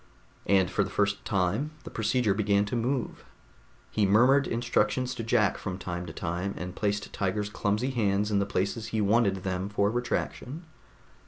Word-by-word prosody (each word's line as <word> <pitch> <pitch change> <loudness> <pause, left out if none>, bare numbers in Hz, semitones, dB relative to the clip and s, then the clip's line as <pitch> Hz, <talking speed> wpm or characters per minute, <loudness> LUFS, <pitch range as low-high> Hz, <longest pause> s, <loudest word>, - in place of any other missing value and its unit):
And 95 -3 +3
for - - +2
the - - -5
first 100 0 0
time 100 - 0
the - - -9
procedure 115 -1 +1
began 100 0 +2
to 100 - -3
move. 125 +2 -2 0.7
He 110 - +1
murmured 125 +7 +5
instructions 120 +1 0
to 115 - -5
Jack 110 -3 +2
from 95 -2 -4
time 90 -2 -5
to - - -6
time, 90 +4 -3
and 90 0 -5
placed 105 -1 -2
Tiger's 105 +1 -1
clumsy 105 +5 0
hands 105 -3 +1
in 100 - +3
the 100 - 0
places 100 +4 -1
he 110 - -2
wanted 100 -2 +2
them 95 +1 -2
for 100 0 +1
retraction. 125 +5 -3
105 Hz, 170 wpm, -28 LUFS, 100-115 Hz, 0.7 s, murmured